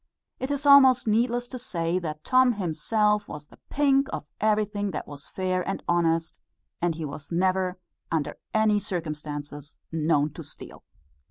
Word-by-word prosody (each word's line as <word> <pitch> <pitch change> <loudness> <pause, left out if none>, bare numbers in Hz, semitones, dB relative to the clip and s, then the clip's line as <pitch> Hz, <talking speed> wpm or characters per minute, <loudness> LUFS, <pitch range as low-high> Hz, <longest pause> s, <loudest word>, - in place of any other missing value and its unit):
It 260 - -3
is 285 0 -2
almost 265 -3 +7
needless 240 +2 +1
to 255 - -6
say 175 -6 -1
that 155 -3 -6
Tom 255 -1 +4
himself 210 +3 0
was 150 -1 -8
the - - -20
pink 275 -1 +3
of - - -5
everything 210 -1 +1
that - - -4
was 145 -1 -10
fair 185 -1 -1
and 195 - -3
honest; 165 -1 +1 0.6
he 160 -1 -4
was 145 +2 -8
never, 185 +1 +1 0.3
under 160 -3 -2
any 215 -1 +3
circumstances, 150 -5 -5
known 155 -2 +1
to - - -8
steal. - - -11
185 Hz, 150 wpm, -26 LUFS, 155-220 Hz, 0.6 s, almost